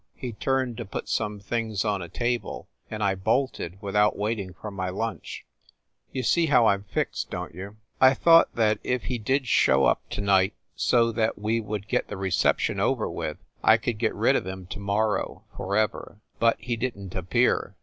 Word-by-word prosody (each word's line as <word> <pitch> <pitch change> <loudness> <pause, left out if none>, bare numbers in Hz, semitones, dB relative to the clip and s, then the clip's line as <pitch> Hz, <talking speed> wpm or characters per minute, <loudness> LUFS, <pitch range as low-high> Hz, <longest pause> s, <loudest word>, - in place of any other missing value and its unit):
He 125 -3 -5
turned 130 +1 -1
to 120 - -5
put 100 - -6
some 105 -1 -2
things 110 0 -2
on 100 -2 0
a 85 - -7
table, 120 +3 -2 0.2
and 110 -1 -4
I 100 -1 +2
bolted 95 -2 -1
without 105 +1 +2
waiting 105 -2 -2
for 105 - -7
my 95 -2 -3
lunch. 115 +5 -5 0.7
You 130 - -3
see 170 +4 +3
how 125 -5 +5
I 105 - +5
m 100 +1 -6
fixed, - - -2
don - - -5
t 85 - -12
you? 100 +3 -8 0.2
I 130 +1 +7
thought 165 +3 +6
that 110 -2 +2
if 125 -2 -1
he 125 -2 -3
did 130 +5 0
show 70 - +4
up - - +2
to - - -4
night, 95 0 +3 0.2
so 115 -1 +3
that 110 0 0
we 110 +3 0
would 105 -1 -5
get 125 - 0
the 105 - -6
reception 95 -2 +1
over - - +1
with, - - -4 0.3
I 110 - +6
coul 120 +2 -2
d 105 - -13
get 110 -1 0
rid - - +3
of - - -1
him 95 -1 -6
to - - -5
mor 105 +2 +1
row, - - -6
forever. 105 +1 -1 0.2
But 115 0 +3
he 120 +1 -2
didn 105 -6 -4
t 95 - -3
appear." 120 +8 +1
110 Hz, 205 wpm, -26 LUFS, 100-120 Hz, 0.7 s, I